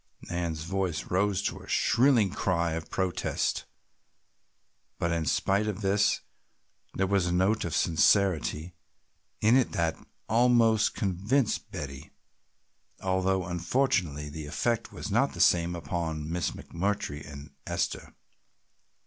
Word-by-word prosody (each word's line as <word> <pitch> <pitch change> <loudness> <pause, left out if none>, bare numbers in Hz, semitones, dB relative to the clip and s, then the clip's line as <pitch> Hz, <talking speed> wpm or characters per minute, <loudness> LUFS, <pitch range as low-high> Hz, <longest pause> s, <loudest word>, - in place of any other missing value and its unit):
Nan's 85 -3 -2
voice 95 -2 -2
rose 100 +1 +1
to - - -2
a - - -13
shrill 120 -2 +3
cry 85 -4 0
of 80 0 -5
protest, 95 -2 -1 1.3
but 85 - -1
in 85 -2 -1
spite 100 +9 +1
of 105 0 -3
this 100 +1 +2 0.7
there 95 - +1
was 95 -2 +1
a - - 0
note 95 +5 +2
of 80 -3 -2
sincerity 85 -1 +2 0.7
in 110 +3 +5
it 130 -2 +2
that 80 -1 0 0.3
almost 115 -2 +3
convinced 105 +6 0
Betty, 70 -2 -7 0.9
although 95 0 +1
unfortunately 85 - 0
the 75 0 -7
effect 115 +9 -1
was - - -6
not - - +2
the - - -9
same 85 0 +3
upon 80 -1 -3
Miss 85 +1 -1
McMurtry 85 -5 -3
and 75 +1 -10 0.2
Esther. - - -3
90 Hz, 125 wpm, -28 LUFS, 80-105 Hz, 1.3 s, in